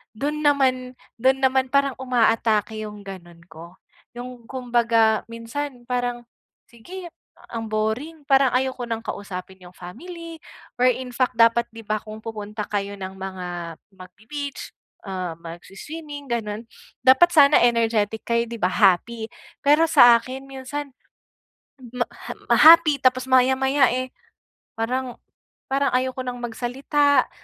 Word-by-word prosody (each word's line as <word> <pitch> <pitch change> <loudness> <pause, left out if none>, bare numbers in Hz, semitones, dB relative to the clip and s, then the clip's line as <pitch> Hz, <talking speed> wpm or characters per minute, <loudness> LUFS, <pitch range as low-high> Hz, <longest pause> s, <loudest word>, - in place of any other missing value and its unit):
do'n 295 +6 -2
naman 255 -3 +1 0.2
do'n 265 +2 +3
naman 265 0 +3
parang 280 0 +3
umaatake 225 -3 +1
yung 210 -1 -8
ganun 175 -3 -10
ko. 170 +2 -12 0.4
Yung 245 -1 -9
kumbaga, 235 -4 +1
minsan 245 +3 -6
parang 245 -1 -2 0.5
sige 350 +11 -10 0.4
ang 225 -1 -4
boring 250 +9 -2
parang 270 -2 +4
ayoko 260 -1 -1
nang 230 -1 -2
kausapin 190 -2 -7
'yong 180 0 -15
family, 330 - -10 0.4
or 250 - +5
in 250 0 -6
fact 255 -2 0
dapat, 230 +1 +4
'di 225 0 -11
ba, 215 0 0
kung 215 0 -9
pupunta 210 -1 -6
kayo 200 -1 -3
ng 190 0 -5
mga 190 -1 -6 0.4
magbe-beach, 220 +10 -8 0.4
uh, 185 -3 -4
magswi-swimming 280 - -9
gano'n 215 -2 -3 0.4
dapat 265 +7 +6
sana 290 0 +7
energetic 225 -2 +1
kayo, 235 0 0
'di 235 - -6
ba, 180 +1 +1
happy. 215 +4 +2 0.3
Pero 295 +3 +4
sa 240 -5 +7
akin, 260 +3 -9
minsan 270 +1 -7 1.0
ma 245 -1 -1 0.2
ham - - -7 0.2
happy 315 -3 +7
tapos 255 0 +2
maya-maya 265 +1 +4
eh, 255 +1 -3 0.7
parang 250 +2 -2 0.5
parang 275 0 +1
ayoko 255 0 0
nang 245 -1 -5
magsalita, 265 +5 +1
245 Hz, 130 wpm, -23 LUFS, 215-265 Hz, 1.0 s, sana